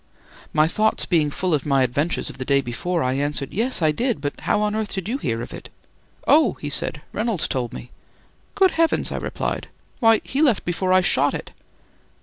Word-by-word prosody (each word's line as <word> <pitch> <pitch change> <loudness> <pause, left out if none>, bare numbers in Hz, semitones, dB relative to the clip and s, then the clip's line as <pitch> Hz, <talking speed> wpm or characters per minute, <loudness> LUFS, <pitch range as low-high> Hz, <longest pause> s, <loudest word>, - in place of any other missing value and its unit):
My 155 0 +4
thoughts 215 +5 +1
being 160 -4 +2
full 180 +4 -1
of 145 - +1
my 135 -2 +3
adventures 145 +7 -1
of - - -9
the - - -2
day 140 +1 +3
before, 155 +7 -2
I 130 0 +1
answered: 140 0 -2
"Yes, 230 -3 0
I 155 - +4
did; 240 - -1
but 145 0 -3
how - - +1
on 210 0 0
earth 220 -1 -2
did 190 -1 -4
you 255 +5 -2
hear 115 - -2
of - - -9
it?" - - -9 0.6
"Oh!" 305 +1 +5
he 145 - -6
said, 150 +2 -2
"Reynolds 215 -5 -1
told 125 -4 -2
me." 120 - -9 0.6
"Good 380 -2 +4
heavens," 330 0 +1
I - - -2
replied, - - -3 0.3
"why, 225 -2 +5
he 275 - -2
left 260 -10 +3
before 185 +2 -1
I 185 0 +6
shot 185 - +2
it." - - -7
175 Hz, 205 wpm, -22 LUFS, 140-220 Hz, 0.6 s, I